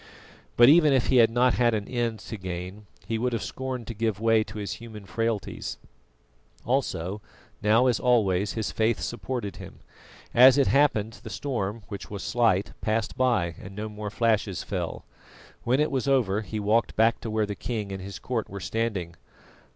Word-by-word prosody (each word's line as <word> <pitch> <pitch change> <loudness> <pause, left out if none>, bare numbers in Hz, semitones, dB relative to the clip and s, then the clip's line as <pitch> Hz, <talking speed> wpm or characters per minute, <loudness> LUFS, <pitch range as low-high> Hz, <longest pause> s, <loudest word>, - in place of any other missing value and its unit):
But 120 - +8
even 155 0 +6
if 130 -3 +2
he 130 - +4
had 115 -2 +7
not 125 +1 +3
had 120 -2 +2
an 105 -1 -3
end 120 -3 -1
to 110 - -7
gain, 95 +2 -6 0.2
he 115 -1 -2
would 125 +1 0
have 115 - -2
scorned 130 -2 -5
to 115 - -6
give 110 -2 -1
way 115 -1 +3
to 100 +2 -9
his 100 -1 -3
human 110 -3 -10
frailties; 110 +1 -3 0.9
also, 105 -7 -1 0.4
now 110 +4 +4
as 125 -3 +2
always, 105 -6 +2
his 110 -2 -2
faith 110 0 +1
supported 120 -3 -4
him. - - -10 0.6
As 130 +3 +8
it 140 - +4
happened 115 -7 +2
the 110 - -8
storm, 110 -1 -3
which 100 -3 -7
was 100 -1 -6
slight, 105 -5 +1
passed 110 0 -1
by, 120 -10 +1
and 95 0 -10
no 105 +1 -4
more 105 0 -6
flashes 110 -4 0
fell. - - -4 0.6
When 125 +3 +2
it 150 +1 +1
was 135 0 -1
over 115 -7 +2
he 110 0 -5
walked 105 +3 +1
back 115 +1 +3
to 115 - -5
where 110 0 +1
the 105 - -4
king 105 -2 -4
and 95 -1 -5
his 95 0 -7
court 115 +3 -3
were 100 - -6
standing. 95 -2 -2
110 Hz, 185 wpm, -26 LUFS, 100-120 Hz, 0.9 s, But